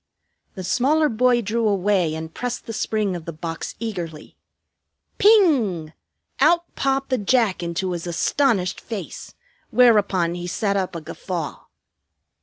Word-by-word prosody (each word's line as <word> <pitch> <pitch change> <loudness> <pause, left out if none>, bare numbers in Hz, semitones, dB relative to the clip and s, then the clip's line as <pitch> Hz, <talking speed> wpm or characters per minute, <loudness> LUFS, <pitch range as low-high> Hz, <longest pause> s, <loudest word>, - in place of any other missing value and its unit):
The 185 - -6
smaller 290 - +2
boy 240 +1 +2
drew 225 +2 0
away 190 -5 +1
and 160 0 -7
pressed 245 0 -4
the 225 - -6
spring 215 -3 -1
of 170 -2 -7
the 170 - -4
box 165 +1 -6
eagerly. 175 -9 -6 0.8
Ping! 255 - +4 0.5
Out 340 +5 +4
popped 270 0 -1
the 255 - +2
Jack 215 -2 +2
into 175 +2 -2
his 175 0 -4
astonished 185 +2 +1
face; 220 -4 -7 0.3
whereupon 205 -8 +4
he 175 0 -5
set 200 +3 -1
up 190 -2 -2
a 165 - -5
guffaw. 165 0 -6
200 Hz, 135 wpm, -22 LUFS, 175-245 Hz, 0.8 s, Ping